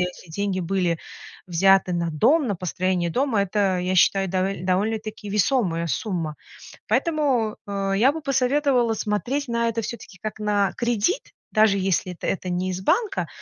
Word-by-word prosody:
эти 180 -1 -4
деньги 195 +1 -2
были 175 -2 0 0.5
взяты 190 +1 +4
на 170 -1 -1
дом, 290 - +3
на 205 - 0
построение 180 0 -1
дома. 245 - +1
Это, 195 -1 +1
я 185 +1 -1
считаю, 195 +1 +4
довел 185 0 -1
довольно-таки 210 +2 -1
весомая 195 -6 +1
сумма. 165 -4 -2 0.5
Поэтому, 280 - +1
э, 195 -1 -1
я 245 +8 +4
бы 320 - -6
посоветовала 265 -3 +2
смотреть 240 +7 -2
на 235 0 0
это 230 0 -2
всё-таки 210 -4 -7
как 215 0 -6
на 205 -2 +1
кредит, 240 - 0 0.2
даже 215 -2 +4
если 185 -1 0
это 170 - -6
это 185 -1 -2
не 180 +1 -1
из 185 - -4
банка, 415 - +1
200 Hz, 155 wpm, -23 LUFS, 185-235 Hz, 0.5 s, взяты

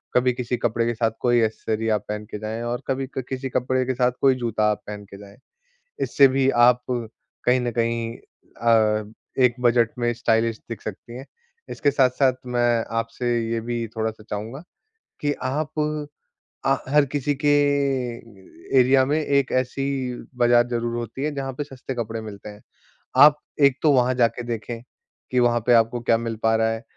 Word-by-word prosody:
कभी 125 0 +3
किसी 125 0 -3
कपड़े 115 0 0
के 120 - 0
साथ 115 -1 +1
कोई 120 -1 +3
एक्सेसरी 110 0 -2
आप 105 -2 0
पहन 105 0 -4
के 105 - -5
जाएँ 110 +2 -4
और 120 +1 -3
कभी 135 0 -1
क 130 - +1
किसी 130 0 -4
कपड़े 130 +1 0
के 130 - -1
साथ 125 0 +2
कोई 135 -1 +5
जूता 110 -3 0
आप 105 - -4
पहन 105 0 -7
के 100 - -9
जाएँ। 100 0 -14 0.7
इससे 140 -1 +5
भी 135 0 +1 0.2
आप 125 0 +4
कहीं 125 +1 -2
न 120 -1 -1
कहीं 115 0 -1
अ, 110 -2 0 0.3
एक 120 - +4
बजट 120 -1 +3
में 120 0 +1
स्टाइलिश 115 -1 +1
दिख 115 - -6
सकती 110 +3 -8
हैं। 130 +2 -9 0.4
इसके 145 - +1
साथ-साथ 130 -1 +3 0.2
मैं 120 -1 +2
आपसे 115 +2 -2 0.2
ये 115 0 -1
भी 115 0 -3
थोड़ा-सा 110 -1 -3
चाहूँगा 110 +8 -5 0.6
कि 145 -1 +1
आप 150 +4 -2 0.9
आ 135 0 +4
हर 150 0 +5
किसी 145 0 0
के - - +4 1.3
एरिया 130 +1 +5
में 150 +3 +1
एक 140 -2 +1
ऐसी 130 +2 -4 0.5
बाज़ार 120 0 +4
ज़रूर 120 -1 -2
होती 120 +3 -5
है 150 -1 -2
जहाँ 135 -1 -3
पे 145 - -4
सस्ते 135 -1 -7
कपड़े 115 -1 -4
मिलते 105 -1 -9
हैं, 105 0 -12 0.5
आप 150 0 +8 0.2
एक 140 -2 +5
तो 155 - +5
वहाँ 130 -1 +3
जाके 120 -1 +1
देखें 115 0 -5 0.5
कि 125 - +1
वहाँ 120 -1 +3
पे 125 - +5
आपको 115 +1 +3
क्या 115 -1 +2
मिल 115 -1 -4
पा 115 - +4
रहा 110 0 +2
है। 115 +1 -4
120 Hz, 180 wpm, -23 LUFS, 115-130 Hz, 1.3 s, आप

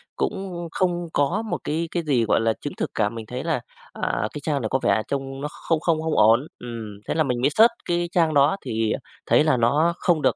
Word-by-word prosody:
cũng 175 -3 -3
không 175 -2 -1
có 170 +10 +1
một 220 - -3
cái 165 +2 -1
cái 175 - -1
gì, 130 -7 +2
gọi 110 - +2
là, 115 0 +2
chứng 145 - -4
thực - - -2
cả. 105 -1 +2
Mình 115 0 -7
thấy 125 +5 -5
là, 160 -7 -1 0.3
à, 100 +2 -1
cái 150 - -6
trang 145 -2 -1
này 110 - -2
có 130 - +1
vẻ 110 - +3
trông 135 -1 -4
nó 150 - -2 0.2
không 165 -2 +3
không 160 -1 +1
không 160 -1 -1
ổn, 115 +7 +5
ừm, 115 -4 -7
thế - - 0
là 160 - +3
mình 125 -3 -1
mới 140 - +4
search 225 +9 +6
cái 175 0 0
trang 165 -3 +2
đó 145 +5 +4
thì 110 -1 0 0.3
thấy - - +4
là 155 -5 +3
nó 150 +9 +3
không 170 -4 +1
được - - +2
145 Hz, 245 wpm, -24 LUFS, 120-170 Hz, 0.3 s, search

